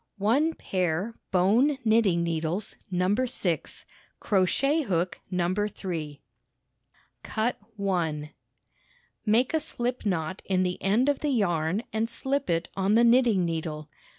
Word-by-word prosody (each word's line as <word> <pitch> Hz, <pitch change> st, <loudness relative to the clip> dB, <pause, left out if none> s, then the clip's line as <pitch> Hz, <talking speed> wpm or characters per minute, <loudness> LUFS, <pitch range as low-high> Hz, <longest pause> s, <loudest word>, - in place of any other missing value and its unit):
One 270 Hz, +11 st, +2 dB
pair 185 Hz, +3 st, -1 dB, 0.2 s
bone 225 Hz, +11 st, +3 dB
knitting 215 Hz, -6 st, +3 dB
needles 165 Hz, +5 st, -2 dB
No. 180 Hz, +1 st, +1 dB
6, 225 Hz, -8 st, -2 dB, 0.3 s
crochet 250 Hz, -, +2 dB
hook 180 Hz, -, -1 dB
No. 180 Hz, -1 st, 0 dB
3. 180 Hz, -7 st, -3 dB, 1.0 s
Cut 225 Hz, +2 st, -1 dB, 0.2 s
1 175 Hz, -7 st, -1 dB
1. 150 Hz, -, -9 dB, 1.0 s
Make 235 Hz, +6 st, +3 dB
a -, -, +4 dB
sHp 250 Hz, -5 st, -2 dB
knot 180 Hz, -1 st, -2 dB
in 185 Hz, -1 st, +1 dB
the 180 Hz, 0 st, -2 dB
end 215 Hz, +7 st, +2 dB
of 285 Hz, -1 st, +2 dB
the 300 Hz, -, -1 dB
yarn 180 Hz, -, +1 dB
and 220 Hz, +1 st, 0 dB
slip 275 Hz, +3 st, -2 dB
it 165 Hz, 0 st, 0 dB
on 195 Hz, +2 st, +2 dB
the 235 Hz, -, +5 dB
knitting 235 Hz, -6 st, +4 dB
needle. 155 Hz, -2 st, -4 dB
195 Hz, 130 wpm, -27 LUFS, 175-235 Hz, 1.0 s, the